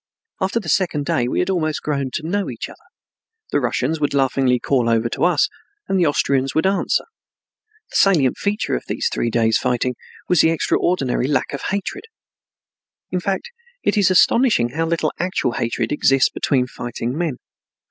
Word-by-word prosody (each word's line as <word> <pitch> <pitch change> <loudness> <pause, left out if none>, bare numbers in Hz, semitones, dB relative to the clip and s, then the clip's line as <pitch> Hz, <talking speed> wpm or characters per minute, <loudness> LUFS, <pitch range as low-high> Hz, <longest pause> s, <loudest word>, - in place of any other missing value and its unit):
After 195 +5 +1
the 200 - -9
second 160 -5 +1
day 120 -3 +1
we - - -2
had 180 +2 +1
almost 155 -4 -1
grown 140 -3 -1
to 155 - -3
know 200 +3 -1
each - - -6
other. - - -16 0.7
The - - +2
Russians 130 +4 -1
would 145 -1 0
laughingly 135 -2 +2
call 125 -2 +1
over 115 0 +2
to - - 0
us, 175 -4 +3 0.4
and 195 - +1
the 170 - +3
Austrians 135 -2 +1
would 160 - +2
answer. 195 +1 +1 0.9
The - - 0
salient 155 -10 +3
feature 205 +1 -1
of 60 - -4
these - - -1
three 120 - 0
days' 115 -1 +2
fighting 125 0 0 0.3
was 180 -4 +4
the 160 - +4
extraordinary 155 -5 0
lack 140 -2 0
of 140 - -4
hatred. 200 - -3 1.1
In 180 - 0
fact, 195 - -3 0.3
it - - +1
is 205 -3 +4
astonishing 185 - +4
how 165 +6 -2
little 165 0 0
actual 180 -8 0
hatred 115 0 -2
exists 135 -2 +3
between 130 -3 0
fighting 120 0 -5
men. 160 -6 -2
145 Hz, 175 wpm, -20 LUFS, 125-180 Hz, 1.1 s, was